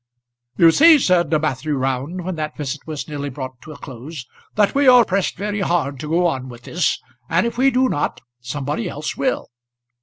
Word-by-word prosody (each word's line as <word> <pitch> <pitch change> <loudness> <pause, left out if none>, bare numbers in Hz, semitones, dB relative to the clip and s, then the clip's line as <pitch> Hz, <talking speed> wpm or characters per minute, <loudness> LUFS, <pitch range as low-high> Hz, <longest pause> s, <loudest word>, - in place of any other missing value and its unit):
"You 165 -1 +7
see," 320 - +7
said 180 - +2
Matthew 150 -1 0
Round, 135 +7 -2
when 185 - -2
that 155 -2 -5
visit 145 -1 -4
was 155 -2 -5
nearly 145 -2 -4
brought 130 -1 -7
to 155 - -11
a 150 - -10
close, 130 +2 -9 0.3
"that 205 -1 +3
we 280 0 +3
are 250 -2 +8
pressed 195 0 -1
very 205 +2 -3
hard 170 -7 0
to 150 - -6
go 175 +2 +2
on 130 -6 -1
with 120 -1 -12
this, 175 +4 0 0.3
and 170 +5 +2
if 235 - -2
we 265 +3 +4
do 260 0 +2
not, 145 - -2 0.2
somebody 130 +1 -3
else 150 +1 -4
will." 270 -2 -1
155 Hz, 195 wpm, -20 LUFS, 140-195 Hz, 0.3 s, are